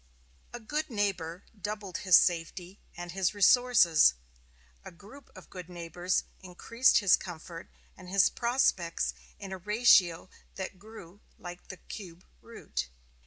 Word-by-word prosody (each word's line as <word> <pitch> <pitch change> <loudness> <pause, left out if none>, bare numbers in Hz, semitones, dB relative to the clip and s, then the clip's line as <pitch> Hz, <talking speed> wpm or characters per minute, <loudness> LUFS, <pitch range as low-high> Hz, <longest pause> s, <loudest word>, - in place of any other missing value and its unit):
A 240 - -8
good 295 +8 -4
neighbor 195 -6 -3
doubled 205 -2 -6
his 185 -2 +4
safety 175 +3 0 0.2
and 175 0 -7
his 190 +2 -1
resources, 205 - +5 0.7
a - - -9
group 205 +11 -16
of - - -15
good 180 -2 -9
neighbors 175 +1 -3 0.2
increased 230 +7 +1
his 200 -4 +5
comfort 170 -1 -10 0.3
and 180 -1 -13
his 195 0 +4
prospects 235 -8 0 0.2
in 195 -2 -9
a 190 - -6
ratio 190 -4 +3 0.3
that 190 -1 -7
grew 205 -3 -14 0.2
like 175 0 -11
the 185 - -9
cube 180 -2 -11 0.2
root. - - -6
185 Hz, 130 wpm, -29 LUFS, 175-210 Hz, 0.7 s, resources